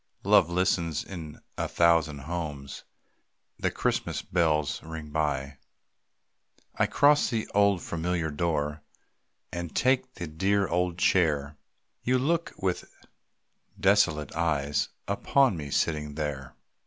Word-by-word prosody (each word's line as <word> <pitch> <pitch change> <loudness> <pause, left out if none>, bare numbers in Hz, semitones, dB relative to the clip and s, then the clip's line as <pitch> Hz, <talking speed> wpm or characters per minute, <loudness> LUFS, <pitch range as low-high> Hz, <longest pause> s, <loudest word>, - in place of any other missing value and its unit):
Love 80 - +5
listens 85 -3 0
in 80 -6 -8 0.2
a - - 0
thousand 80 -4 +2
homes, 75 -3 -5 0.7
The - - +1
Christmas - - -1
bells 80 -4 +1
ring 80 -2 -8
by. 70 -3 -1 1.1
I - - +1
cross 145 +1 +4
the 115 -3 -2
old 100 -3 +3
familiar 85 -1 -2
door 75 -1 -1 0.7
And 85 -1 -5
take 130 0 +1
the 85 - -5
dear 95 +5 +1
old 90 -1 0
chair. 75 -6 +2 0.5
You 130 +1 +2
look 165 +6 0
with 95 -2 -2 0.9
desolated 90 -7 +3
eyes 75 -3 0 0.2
Upon 115 +4 +2
me 75 -3 -6
sitting 75 0 -1
there. 70 -4 -4
85 Hz, 115 wpm, -28 LUFS, 75-95 Hz, 1.1 s, Love